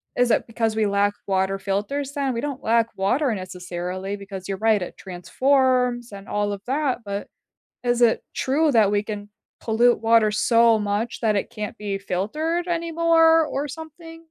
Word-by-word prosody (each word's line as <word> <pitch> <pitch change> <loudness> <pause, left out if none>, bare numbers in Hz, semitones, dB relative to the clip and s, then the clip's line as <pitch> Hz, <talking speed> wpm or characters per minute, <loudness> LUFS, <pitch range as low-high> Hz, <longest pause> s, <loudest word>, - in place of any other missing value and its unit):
Is 245 -1 +2
it - - +2
because 225 -1 -1
we 220 -1 +2
lack 200 0 +2
water 190 0 0
filters 210 +9 -2
then? 275 -3 -1
We 230 - -3
don't 285 -3 -5
lack 230 0 +2
water 240 +7 +1
necessarily, 185 +1 -5
because 195 -2 -8
you're 195 -1 -3
right, 210 -3 +3
it 180 - -6
transforms 250 +5 +1
and 195 0 -10
all 205 0 -1
of 200 - -7
that, 275 -1 0
but 200 0 -5 0.6
is 240 0 +1
it 230 - +3
true 295 +3 +1
that 220 -4 +4
we 205 0 +1
can 205 -1 -6 0.3
pollute 235 0 +2
water 225 -1 +4
so 230 +1 +4
much 210 +3 -2
that 215 -3 +1
it - - -1
can't 215 -3 -6
be 205 -2 -3
filtered 305 - -2
anymore 330 -1 +3
or 290 0 -3
something? 325 +2 -10
225 Hz, 170 wpm, -23 LUFS, 200-275 Hz, 0.6 s, that